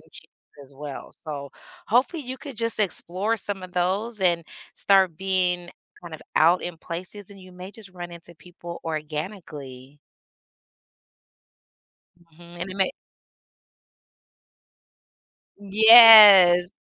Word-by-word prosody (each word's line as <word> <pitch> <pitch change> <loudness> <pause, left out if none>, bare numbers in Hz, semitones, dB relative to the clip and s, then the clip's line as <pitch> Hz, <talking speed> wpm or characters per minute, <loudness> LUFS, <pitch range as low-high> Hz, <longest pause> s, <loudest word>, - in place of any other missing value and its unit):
gems - - -14 0.4
as 140 0 -18
well. 145 -1 -11
So, 140 -2 -8 0.4
hopefully, 255 - -1
you 260 0 -9
could 275 -7 -11
just 230 0 -3
explore 200 +2 -3
some 200 -3 -6
of 185 -1 -12
those, 195 +5 -3
and 170 -2 -1 0.3
start 190 -4 +1
being 180 -1 -2 0.3
kind 170 -2 -11
of 155 - -12 0.2
out 170 +3 +2
in 175 -1 -8
places, 185 +5 -9
and 200 -1 -16
you 185 0 -16
may 180 +2 -12
just 210 -3 -14
run 175 -1 -11
into 170 0 -14
people 170 +1 -13
organically. 150 -4 -9 2.3
Mhm, 170 +1 -16
and 185 +2 -6
it 185 - -10
may 190 -1 -1 2.7
Yes, 205 -4 +7
180 Hz, 120 wpm, -22 LUFS, 170-205 Hz, 2.7 s, Yes